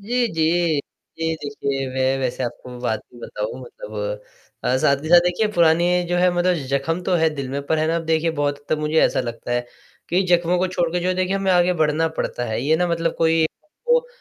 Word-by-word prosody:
जी, 240 Hz, +4 st, 0 dB
जी। 165 Hz, -1 st, +2 dB, 0.4 s
जी 160 Hz, 0 st, 0 dB
देखिए, 140 Hz, -1 st, -3 dB
मैं 130 Hz, 0 st, +1 dB
वैसे 130 Hz, 0 st, -2 dB
आपको 125 Hz, +1 st, -6 dB
बात 110 Hz, -3 st, -1 dB
भी 120 Hz, -, -14 dB
बताऊँ -, -, -5 dB
मतलब -, -, -6 dB, 0.6 s
साथ 140 Hz, +1 st, +2 dB
ही 155 Hz, -, -5 dB
साथ 175 Hz, 0 st, +8 dB
देखिए 180 Hz, +5 st, +1 dB
पुरानी 175 Hz, +1 st, +3 dB
जो 175 Hz, -, 0 dB
है 180 Hz, 0 st, +4 dB
मतलब 175 Hz, +1 st, +2 dB
जख्म 160 Hz, +6 st, -1 dB
तो 180 Hz, -, 0 dB
हैं 160 Hz, -2 st, +2 dB
दिल 135 Hz, -2 st, -4 dB
में, 140 Hz, +1 st, -2 dB
पर 160 Hz, -, +1 dB
है 155 Hz, -, +1 dB
ना, 165 Hz, +1 st, +1 dB
अब 165 Hz, -, -3 dB
देखिए 160 Hz, +1 st, +1 dB
बहुत 145 Hz, -2 st, -1 dB
हद 145 Hz, -, -27 dB
तक 155 Hz, -, +2 dB
मुझे 155 Hz, +1 st, +2 dB
ऐसा -, -, +3 dB
लगता 120 Hz, 0 st, -5 dB
है 120 Hz, 0 st, -1 dB, 0.4 s
कि 180 Hz, +3 st, +2 dB
जख्मों 175 Hz, 0 st, +3 dB
को 185 Hz, -, +2 dB
छोड़कर 175 Hz, -1 st, -1 dB
जो 185 Hz, 0 st, +1 dB
देखिए 185 Hz, +1 st, 0 dB
हमें 195 Hz, -1 st, 0 dB
आगे 180 Hz, 0 st, +4 dB
बढ़ना 160 Hz, 0 st, +1 dB
पड़ता 140 Hz, -6 st, -3 dB
है। 110 Hz, 0 st, -2 dB
ये 155 Hz, +3 st, +3 dB
ना 180 Hz, +1 st, +1 dB
मतलब 165 Hz, -1 st, 0 dB
कोई 160 Hz, 0 st, +3 dB, 0.4 s
वो 485 Hz, 0 st, +4 dB
165 Hz, 220 wpm, -22 LUFS, 145-180 Hz, 0.6 s, साथ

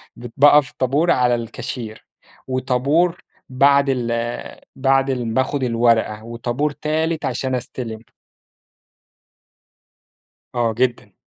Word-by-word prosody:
بت 120 Hz, -1 st, -10 dB
باقف 145 Hz, -1 st, +6 dB
طابور 145 Hz, +7 st, +2 dB
على 120 Hz, -4 st, +1 dB
الcashier 110 Hz, -1 st, -7 dB, 0.5 s
وطابور 135 Hz, +7 st, +1 dB, 0.3 s
بعد 140 Hz, +2 st, +4 dB
ال 125 Hz, -3 st, -1 dB, 0.6 s
بعد 135 Hz, 0 st, +2 dB
الم 120 Hz, -4 st, -2 dB
بآخُد 130 Hz, +2 st, 0 dB
الورقة 115 Hz, -3 st, +1 dB
وطابور 120 Hz, +5 st, -2 dB
3 155 Hz, +1 st, -2 dB
عشان 130 Hz, 0 st, -2 dB
أستلم. 120 Hz, -3 st, -6 dB, 2.5 s
آه 120 Hz, -2 st, +1 dB
جدًا، 125 Hz, +1 st, -1 dB
130 Hz, 95 wpm, -20 LUFS, 120-140 Hz, 2.5 s, باقف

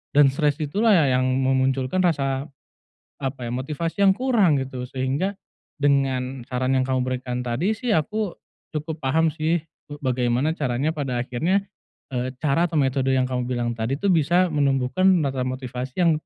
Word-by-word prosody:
dan 145 Hz, -1 st, +7 dB
stres 145 Hz, +1 st, +1 dB
itu 150 Hz, +7 st, -3 dB
lah 220 Hz, -3 st, +6 dB
ya 130 Hz, -2 st, +2 dB
yang -, -, +1 dB
memunculkan 130 Hz, +4 st, +1 dB
rasa 140 Hz, -4 st, 0 dB, 0.7 s
apa, 135 Hz, -2 st, -3 dB
ya, 120 Hz, -, -4 dB
motivasi 155 Hz, +8 st, -3 dB
yang 195 Hz, -1 st, +7 dB
kurang, 220 Hz, -, +3 dB
gitu, 130 Hz, -1 st, -4 dB
sehingga 140 Hz, +10 st, -2 dB, 0.4 s
dengan 135 Hz, -2 st, +1 dB
saran 130 Hz, +1 st, 0 dB
yang 130 Hz, -, +3 dB
kamu 130 Hz, -1 st, 0 dB
berikan 125 Hz, -1 st, -3 dB
tadi 170 Hz, -, 0 dB
sih 245 Hz, -2 st, 0 dB
aku 205 Hz, +5 st, 0 dB, 0.4 s
cukup 155 Hz, +1 st, -4 dB
paham 160 Hz, +5 st, +2 dB
sih 160 Hz, +2 st, 0 dB, 0.3 s
be 145 Hz, -, -6 dB
bagaimana 125 Hz, +3 st, +1 dB
caranya 135 Hz, 0 st, -1 dB
pada 130 Hz, -5 st, -2 dB
akhirnya, 165 Hz, +11 st, 0 dB, 0.5 s
eee, 125 Hz, +1 st, -1 dB
cara 155 Hz, +3 st, +2 dB
atau 160 Hz, -, 0 dB
metode 135 Hz, -1 st, +1 dB
yang 130 Hz, -1 st, +2 dB
kamu 125 Hz, -1 st, -1 dB
bilang 120 Hz, -1 st, -1 dB
tadi 120 Hz, +6 st, -2 dB
tuh 200 Hz, -, +1 dB
bisa 175 Hz, +2 st, +3 dB
menumbuhkan, 140 Hz, +3 st, +1 dB
menata 140 Hz, -8 st, +1 dB
motivasi 130 Hz, +3 st, -4 dB
yang 170 Hz, -2 st, +5 dB
135 Hz, 165 wpm, -23 LUFS, 130-160 Hz, 0.7 s, dan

